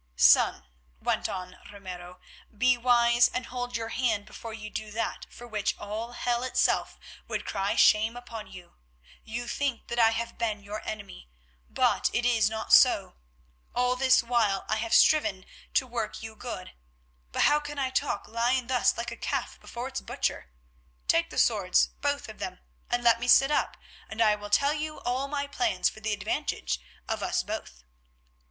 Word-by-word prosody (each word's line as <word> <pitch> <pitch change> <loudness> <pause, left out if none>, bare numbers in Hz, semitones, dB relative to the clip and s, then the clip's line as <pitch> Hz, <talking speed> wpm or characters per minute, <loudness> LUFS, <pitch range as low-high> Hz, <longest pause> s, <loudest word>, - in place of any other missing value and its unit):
"Son," - - +5 0.3
went - - -1
on 185 -1 -6
Ramiro, 180 -3 -9 0.4
"be 250 +3 +4
wise 240 0 +4
and 250 -1 -4
hold 245 0 -4
your 225 0 -5
hand 225 -5 0
before 230 - -9
you 220 -1 -7
do 215 0 -5
that 220 +2 -3
for 240 - -11
which 210 -3 -1
all 220 +3 -5
hell 240 0 -1
itself 255 - +1 0.3
would - - -3
cry 200 0 -1
shame 220 +3 +4
upon 230 -3 -8
you. 180 -2 -12 0.5
You 240 +2 -5
think 270 -1 -2
that 235 - -2
I 225 -1 +6
have 235 +1 -4
been 215 -3 -2
your 210 +2 -6
enemy, - - -7 0.4
but - - +2
it 240 - 0
is 225 -3 +3
not 220 0 -3
so; - - +6 0.6
all 250 +1 +2
this 255 -1 +4
while 230 -5 +1
I 220 - 0
have 225 +1 0
striven 210 -12 +4 0.3
to 260 - +3
work 235 -3 -4
you 220 0 -8
good, 215 -6 -7 0.6
but - - +1
how 295 +1 +5
can 295 0 -8
I 265 -2 -1
talk 280 +2 -1
lying 240 +3 0
thus 250 -1 +2
like 235 - -4
a - - -5
calf - - -3
before 240 +2 -6
its 265 0 -5
butcher? - - -3 0.6
Take - - +3
the - - -9
swords, 60 -1 +3
both - - -1
of - - -11
them, - - -5 0.3
and 240 0 0
let 235 -1 +5
me 240 - -3
sit 270 +3 +6
up, - - 0 0.3
and 220 - -8
I 215 -2 +5
will 205 0 -6
tell 280 +7 +3
you 305 0 -4
all 255 +3 -1
my 285 0 -2
plans 325 +5 0
for - - -13
the 220 0 -2
advantage 190 - -2 0.3
of - - -2
us - - 0
both. - - -7
235 Hz, 180 wpm, -28 LUFS, 210-250 Hz, 0.6 s, I